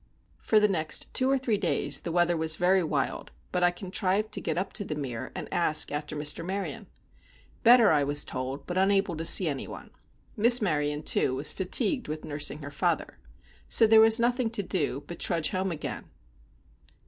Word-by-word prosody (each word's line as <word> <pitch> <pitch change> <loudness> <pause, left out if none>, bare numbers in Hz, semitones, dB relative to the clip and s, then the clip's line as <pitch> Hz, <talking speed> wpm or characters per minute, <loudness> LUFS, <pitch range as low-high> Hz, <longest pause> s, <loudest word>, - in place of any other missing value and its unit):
For 215 - +2
the 210 - +3
next 160 -6 -2
two 260 0 +2
or 275 - +2
three 235 -6 -1
days 165 -7 0
the 170 - -5
weather 175 0 +2
was 160 -1 +2
very 185 +3 +2
wild, 150 -5 -3 0.2
but 180 - -1
I 175 - +4
contrived 190 +3 -2
to - - -3
get - - -3
up 190 +2 -3
to 205 - -1
The 155 - -5
Mere, 130 -6 -6
and - - -6
ask 160 -3 +1
after 150 +1 -5
Mr. 150 +2 -1
Maryon. 195 +3 -5 0.7
Better, 235 -2 +6
I 150 -2 +2
was 145 +1 +1
told, 130 +2 -6
but 180 +1 -2
unable 195 -2 +1
to 165 +1 -5
see 180 +1 +3
any 140 -3 -4
one. - - -11 0.4
Miss 235 +3 +7
Maryon, 150 -7 -1
too, 130 - 0
was 140 +3 -3
fatigued 215 +7 -1
with 155 +1 -6
nursing 145 0 -2
her 145 - -8
father. 145 - -2 0.5
So 225 - +6
there 220 0 +6
was 225 +1 +5
nothing 240 0 0
to 220 -3 -2
do 145 -7 -2
but 170 - -9
to - - +2
trudge 165 -3 0
home 190 0 -2
again. 155 -3 -6
175 Hz, 195 wpm, -27 LUFS, 150-205 Hz, 0.7 s, Miss